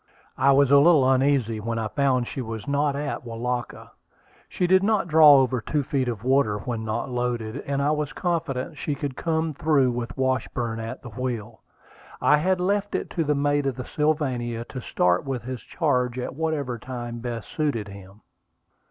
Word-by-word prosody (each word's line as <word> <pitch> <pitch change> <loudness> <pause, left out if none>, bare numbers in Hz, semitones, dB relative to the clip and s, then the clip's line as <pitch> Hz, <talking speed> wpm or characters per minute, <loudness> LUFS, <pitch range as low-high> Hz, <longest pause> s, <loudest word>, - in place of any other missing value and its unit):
I 135 +2 +5
was 140 0 +4
a 140 - +8
little 150 -3 +5
uneasy 130 -4 +2
when 115 +2 -3
I 110 -1 -1
found 130 0 +1
she 135 - -5
was 110 -3 -6
not 140 0 +1
at 145 -1 -3
Welaka. 120 +1 -4 0.6
She 180 - -1
did 185 +1 +5
not 205 -3 +1
draw 155 -3 +8
over 130 -2 +2
two 145 +6 -1
feet 135 -2 -1
of 115 -3 -4
water 130 -5 +2
when 110 +2 -4
not 110 +4 -3
loaded, 120 -1 -2
and 140 0 0
I 145 - +2
was 150 -2 -1
confident 150 -4 -2
she 145 - -2
could 140 -1 -4
come 160 0 -1
through 140 -3 +2
with 120 +1 -5
Washburn 130 -3 -1
at 115 +4 -6
the 120 - -8
wheel. 115 -1 -5 0.6
I 150 - +4
had 185 +4 +1
left 200 +2 0
it - - -3
to 165 - 0
the 150 -1 +1
mate 145 0 +1
of 135 - -1
the 125 - -6
Sylvania 130 -7 -1
to 130 - -6
start 90 -5 +1
with 135 -4 -4
his 130 0 -6
charge 125 -6 0
at 125 - -4
whatever 145 -5 -2
time 120 -1 -6
best 115 -2 -5
suited 145 -9 -1
him. 100 +1 -13
130 Hz, 185 wpm, -25 LUFS, 120-145 Hz, 0.6 s, a